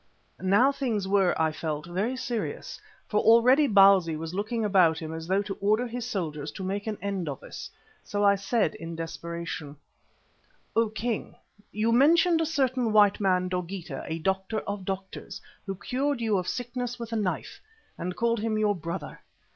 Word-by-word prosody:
Now 205 +9 +4
things 230 -8 -2
were, 190 -3 +2
I 160 -1 +2
felt, 155 -1 -4
very 200 +9 -2
serious, 240 -3 -4 0.3
for 210 - +1
already 250 +6 +6
Bausi 195 - +6
was 160 +2 -6
looking 215 +3 -1
about 180 -6 +4
him 160 -1 -5
as 160 0 -6
though 195 +2 +2
to 200 - -4
order 215 +4 +2
his 245 0 -5
soldiers 155 -9 -3
to 190 - -6
make 200 +3 -3
an 215 -2 -2
end 195 -5 -2
of 140 - -6
us. - - -8 0.3
So 205 0 -2
I 200 0 +6
said 200 -3 0
in 165 0 -7
desperation: 165 -2 -5 1.0
"O 230 -1 +3
King, 220 +1 -3 0.4
you 220 +2 +1
mentioned 325 +7 +5
a 325 - 0
certain 260 -6 +1
white 205 -1 +5
man, 185 -2 +2
Dogeetah, 180 0 -4
a 160 - -2
doctor 190 +5 -1
of 200 -2 -5
doctors, 190 0 -5 0.3
who 195 - -2
cured 270 +7 -1
you 225 -3 +1
of 180 - -5
sickness 245 0 -3
with 235 -1 -6
a - - 0
knife, 205 -4 -2 0.3
and 180 +1 -4
called 235 -1 +1
him 215 0 -1
your 210 -1 +2
brother. 170 +1 -6
200 Hz, 175 wpm, -27 LUFS, 180-230 Hz, 1.0 s, already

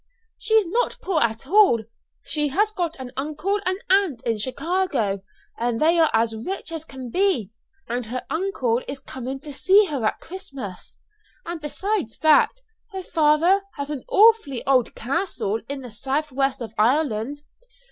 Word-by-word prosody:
"She 440 - +1
is 435 -2 +5
not 475 +8 0
poor 365 -5 +1
at 225 +1 0
all. 365 - +5 0.4
She 300 -1 0
has 410 +10 +1
got 345 -5 -2
an 255 -1 -7
uncle 310 +9 -1
and 370 0 +1
aunt 370 -10 +2
in 225 -2 -1
Chicago, 270 - -1 0.4
and 235 -1 0
they 335 +2 +4
are 320 - +5
as 225 0 +2
rich 335 - -4
as 320 -1 -5
can 260 -5 -8
be; 360 - +1 0.4
and 240 -1 -3
her 250 +2 -4
uncle 320 - 0
is 270 0 -5
coming 265 0 -6
to 295 -1 -8
see 390 +8 +5
her 275 -6 -2
at 215 - 0
Christmas. 275 - -8 0.5
And 340 -1 -5
besides 370 - -2
that, 310 -1 +5 0.4
her 380 -1 -5
father 325 +5 +3
has 280 0 -4
an 280 -4 -4
awfully 425 - +4
old 260 -3 +2
castle 260 - -2
in 280 -1 -4
the 250 -3 -9
south 275 +6 -2
west 270 -1 0
of 225 - -8
Ireland. 265 +2 +1
290 Hz, 165 wpm, -23 LUFS, 245-365 Hz, 0.5 s, is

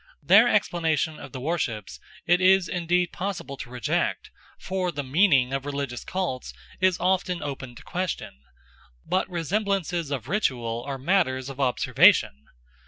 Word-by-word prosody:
Their - - +7
explanations 160 -2 0
of 135 - -10
the 130 - -6
worships 125 - -3 0.3
it 175 +2 +3
is 190 -1 +5
indeed 175 0 0
possible 180 -7 -4
to 120 - -8
reject, 125 -3 -2 0.3
for 185 -1 -2
the 145 -2 -4
meaning 135 -3 +3
of 135 -1 -2
religious 140 -4 -4
cults 175 -9 -3 0.3
is 185 -1 +2
often 180 0 0
open 135 -4 -6
to - - -13
question; 180 - -4 0.6
but 185 +1 0
resemblances 180 -2 -1
of 130 -4 -4
ritual 120 - -1
are 135 -1 -3
matters 135 -4 0
of 135 0 -9
observation. 120 - +3
155 Hz, 140 wpm, -25 LUFS, 130-180 Hz, 0.6 s, Their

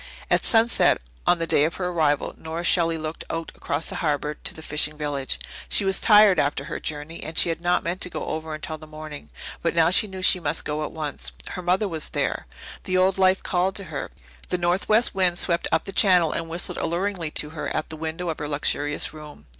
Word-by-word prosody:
At - - +3
sunset 230 +1 +4 0.3
on 175 - +5
the 165 - -1
day 145 - +3
of 160 +2 0
her 180 -1 -2
arrival 155 -4 +1
Nora 160 +2 -6
Shelley 165 -2 +2
looked 155 0 -5
out 165 0 -4
cross 145 +3 -1
the - - -3
harbour 150 -1 -1
to - - -3
the 160 - -10
fishing 150 0 +1
village. 145 -3 -2 0.3
She 200 - +4
was 195 0 +2
tired 210 -5 +7
after 140 -1 0
her 150 - -5
journey, 150 +2 -5
and 160 - -6
she - - +6
had 165 0 -3
not 175 0 +1
meant 175 +3 -3
to 180 - +1
go - - -5
over 160 0 -4
until 155 +1 -5
the 155 - -12
morning, 155 -1 -9 0.3
but 170 0 0
now 165 0 +4
she 210 +3 +3
knew 190 -1 -7
she 185 - +6
must 150 -1 -2
go 150 +1 -2
at - - -4
once. 145 - -5 0.2
Her - - -5
mother 185 +4 +1
was 160 -4 -3
over - - -14
there; - - -1 0.4
the 185 - +1
old 185 +1 +3
life 185 0 +4
called 185 +1 0
to 200 - -1
her; 140 - -4 0.4
the 180 - 0
northwest 190 +6 +2
wind 180 -2 +3
swept 170 -2 +1
up - - +1
the 195 - -5
channel 180 -5 +4
and 165 -1 -4
whistled 170 +2 -2
alluringly 175 -1 -1
to 150 - -1
her 160 - -5
at - - -3
the 160 - -7
window 160 +2 -4
of 160 - -3
her 150 - -3
luxurious 145 0 0
room. 150 - -12
165 Hz, 230 wpm, -24 LUFS, 155-180 Hz, 0.4 s, tired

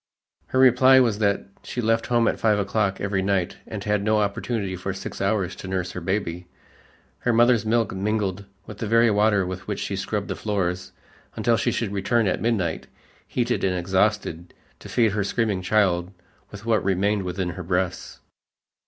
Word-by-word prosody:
Her - - -2
reply 130 +1 +6
was 115 -5 +2
that 100 -2 +1 0.2
she - - -6
left 115 -1 +1
home 120 -1 +2
at - - 0
five 110 -2 +3
o'clock 100 -1 0
every 100 -1 -1
night 95 -2 0
and - - -6
had 105 -1 +1
no 110 +1 +2
opportunity 100 -1 -1
for 95 +2 -4
six - - -7
hours 95 -2 0
to - - -8
nurse 95 -1 -2
her 90 - -6
baby. 90 -1 -2 0.7
Her 125 - +1
mother's 120 -1 +4
milk 115 -2 +1
mingled 100 0 -2 0.2
with - - -10
the 110 - -3
very 115 +1 +4
water 105 -2 +3
with 90 0 -6
which - - -3
she - - -3
scrubbed - - -3
the - - -2
floors 90 -3 -2 0.4
until 120 - +2
she 120 - 0
should 115 -3 -2
return 110 +4 +1
at 95 - 0
midnight, 100 -8 -1 0.4
heated 120 0 -1
and 95 -1 +1
exhausted, 95 -2 -1 0.2
to - - -11
feed 115 -3 +2
her 105 0 0
screaming 105 -1 -1
child 95 -2 +1 0.4
with 105 +1 -11
what 115 -2 +2
remained 100 +2 +1
within 90 0 -3
her 90 +1 -6
breasts. 90 0 -2
100 Hz, 180 wpm, -24 LUFS, 95-110 Hz, 0.7 s, reply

